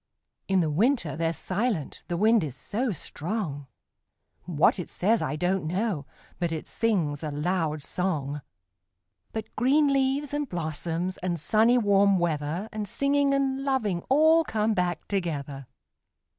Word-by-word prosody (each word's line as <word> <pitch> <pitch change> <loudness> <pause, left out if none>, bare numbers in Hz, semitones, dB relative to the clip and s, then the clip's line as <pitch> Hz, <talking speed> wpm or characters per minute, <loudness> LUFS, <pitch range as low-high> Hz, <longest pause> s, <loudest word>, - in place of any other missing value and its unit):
In 190 -1 +3
the 155 -2 0
winter 200 - +1
they're 165 +1 0
silent 185 - -2
the 175 - -2
wind 220 +1 +4
is 140 -5 -4
so 225 - -1
strong; 160 -4 -4 0.8
What 170 +1 +3
it 175 - -5
says, 220 +5 +1
I - - -1
don't 180 +2 0
know, 180 - -1 0.3
but 170 -2 0
it 160 -1 -4
sings 175 -11 0
a 155 - -3
loud 155 0 -1
song. 150 -6 -2 0.9
But 220 -1 -6
green 280 +4 +3
leaves, 275 +1 0
and 290 -2 -2
blossoms, 170 +2 -3
and 175 -2 -2
sunny 225 +9 +4
warm 200 -3 +4
weather, 160 -1 -1
5 220 - -10
And 215 -1 -4
singing, 280 +4 +2
and 270 0 0
loving 220 -10 0
all 315 +4 +5
come 220 -5 0
back 180 -4 -1
together. 145 -8 -3
185 Hz, 145 wpm, -27 LUFS, 160-230 Hz, 0.9 s, all